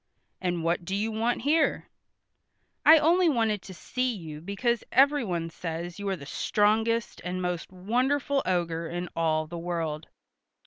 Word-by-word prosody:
"And 175 -2 -1
what 170 +1 0
do 190 +3 -3
you 215 +3 -1
want 230 +2 -1
here?" 305 +2 +2 1.0
"I 320 +1 +9
only 335 +3 +4
wanted 225 -7 +1
to 190 - -10
see 255 +7 -1
you 155 -5 -8
because 215 +6 -1
everyone 235 - +2
says 170 +2 -5
you 200 -1 -3
are 190 - 0
the 140 -5 -10
strongest 220 +8 +1
and 180 +1 -3
most 180 -1 -3
wonderful 260 +9 0
ogre 170 -2 -1
in 175 +1 -4
all 155 -1 +1
the 170 +2 -7
world." 165 -3 -3
190 Hz, 150 wpm, -27 LUFS, 170-240 Hz, 1.0 s, I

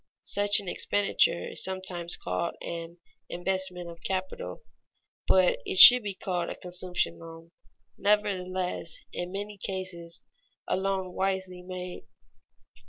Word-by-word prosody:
Such 205 0 +5
an 200 - -8
expenditure 195 -2 +1
is - - 0
sometimes 185 -2 -3
called 170 - -3
"an 170 0 -6 0.3
investment 180 0 -1
of 170 0 -11
capital," 185 - -4 0.6
but 185 -1 +4
it 190 - -4
should 250 +5 +11
be 200 -3 -5
called 180 -4 -3
a - - -5
consumption 180 0 -2
loan 165 0 -12 0.5
nevertheless 185 -5 -1 0.2
in 175 0 -4
many 205 +1 -6
cases 185 -3 -5 0.4
a - - +1
loan 190 -1 -2
wisely 190 -1 -2
made. 180 0 -7
185 Hz, 120 wpm, -28 LUFS, 175-190 Hz, 0.6 s, should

